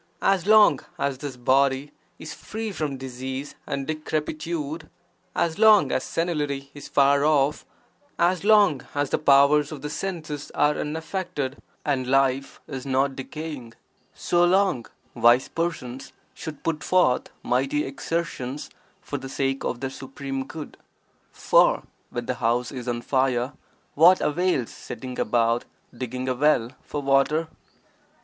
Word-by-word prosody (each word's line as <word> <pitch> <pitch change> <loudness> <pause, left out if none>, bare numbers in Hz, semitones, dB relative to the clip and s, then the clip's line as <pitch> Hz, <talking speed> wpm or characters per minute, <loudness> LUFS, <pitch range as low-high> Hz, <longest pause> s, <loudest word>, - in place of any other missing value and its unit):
As 195 -1 +2
long 215 0 +6 0.2
as 140 -4 -1
this 140 -3 -6
body 135 +2 +2 0.3
is 155 -1 -8
free 220 0 -5
from 150 -7 -3
disease 130 +2 -6
and 140 -1 -3
decrepitude, 155 0 -3 0.5
as 170 +3 0
long 215 -2 +6
as - - 0
senility 145 -5 -2
is 145 -1 -9
far 140 0 +4
off, 150 -1 +2 0.5
as 175 +1 +2
long 205 -10 +5
as 145 -1 0
the - - +1
powers 145 0 +5
of 145 -3 -8
the 150 - -4
senses 155 -5 -5
are 150 0 +3
unaffected 150 -3 -4 0.2
and 130 -4 0
life 135 0 +1
is 130 -2 -6
not 135 0 +1
decaying, 135 -4 -7 0.4
so 175 0 +1
long, 180 - +2 0.3
wise 120 +2 +4
persons 140 -7 -4 0.2
should 155 -3 -8
put 160 -2 -2
forth 180 -9 +2
mighty 135 +4 +1
exertions 140 -2 -4 0.3
for - - -4
the 135 - -8
sake 135 0 -1
of 120 - -3
their 135 -1 -3
supreme 135 0 -6
good, 155 -2 -8 0.5
for - - +3 0.3
when - - -4
the - - -1
house 120 +2 +1
is 125 -3 -7
on 120 -1 -2
fire 130 -1 +1 0.4
what 175 +5 +6
avails 155 -5 0
setting 125 +2 -8
about 115 +1 +1 0.3
digging 125 +1 -4
a 130 - +1
well 125 -3 +2
(for 145 -1 -5
water)? 140 +4 +2
140 Hz, 140 wpm, -25 LUFS, 130-160 Hz, 0.5 s, long